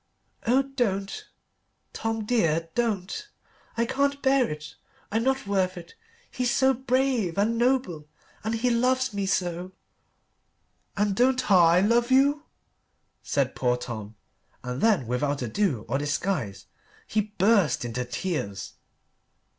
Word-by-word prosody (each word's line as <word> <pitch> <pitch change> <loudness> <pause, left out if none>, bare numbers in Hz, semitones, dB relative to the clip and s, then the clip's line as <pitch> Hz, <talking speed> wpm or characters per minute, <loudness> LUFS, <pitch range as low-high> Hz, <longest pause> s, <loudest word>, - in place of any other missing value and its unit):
"Oh, 260 +4 +4
don't, 220 -8 -2 0.7
Tom, 225 -1 -2
dear 165 -8 +1
don't. 230 - -2 0.5
I 235 - +2
can't 280 +3 0
bear 265 -2 +3
it. 150 +1 -7 0.4
I'm 225 +2 +1
not 265 0 0
worth 190 -2 0
it. 170 -1 -10 0.4
He's 250 -1 -1
so 265 +2 +3
brave 255 -7 0
and 215 +3 +2
noble 240 - 0 0.4
and 220 +2 -1
he 245 +2 +1
loves 255 +1 +1
me 200 -1 -2
so." 180 0 -1 1.2
"And 205 -1 +1
don't 255 0 +2
I 175 -1 +6
love 235 +4 +2
you?" 285 +3 +3 0.8
said 135 -2 0
poor 125 -1 +1
Tom, 110 -3 -7 0.5
and 125 0 -4
then 210 - +3
without 135 +3 -1
ado 120 - -1
or 135 +5 0
disguise 145 - -2 0.4
he 215 - +1 0.2
burst 190 - +3
into 120 +2 -3
tears. 120 - -4
200 Hz, 125 wpm, -26 LUFS, 150-250 Hz, 1.2 s, I